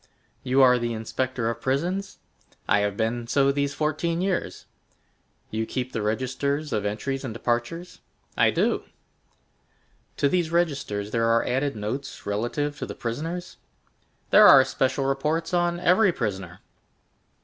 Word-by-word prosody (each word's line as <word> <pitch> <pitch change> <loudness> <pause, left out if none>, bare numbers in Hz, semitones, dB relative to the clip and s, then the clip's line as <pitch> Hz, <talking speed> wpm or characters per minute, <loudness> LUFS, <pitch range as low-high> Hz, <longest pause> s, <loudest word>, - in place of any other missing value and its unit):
"You 130 +1 +3
are 125 -1 +6
the 120 0 -2
inspector 120 +2 -2
of 115 0 -3
prisons?" 175 +10 -2 0.5
"I 105 - +4
have 100 -1 -1
been 115 +1 -1
so 140 +2 +3
these 140 0 -1
fourteen 155 +2 -1
years." 185 -1 -2 0.9
"You 110 +1 -2
keep 130 -1 -3
the 115 - -3
registers 135 +7 -2
of 105 -1 0
entries 135 +7 -3
and 120 -4 -5
departures?" 120 +10 -3 0.3
"I - - +4
do." - - 0 1.3
"To 140 - +3
these 175 +1 +1
registers 140 -12 -1
there 115 -1 +1
are 115 0 +3
added 135 +2 -1
notes 115 +7 -5
relative 120 +8 -2
to - - -4
the - - -7
prisoners?" 165 +10 -5 0.7
"There 210 0 +9
are 135 -1 +8
special 135 +1 0
reports 150 +6 -1
on 175 0 +1
every 185 +3 +4
prisoner." 95 - -4
135 Hz, 140 wpm, -25 LUFS, 115-155 Hz, 1.3 s, There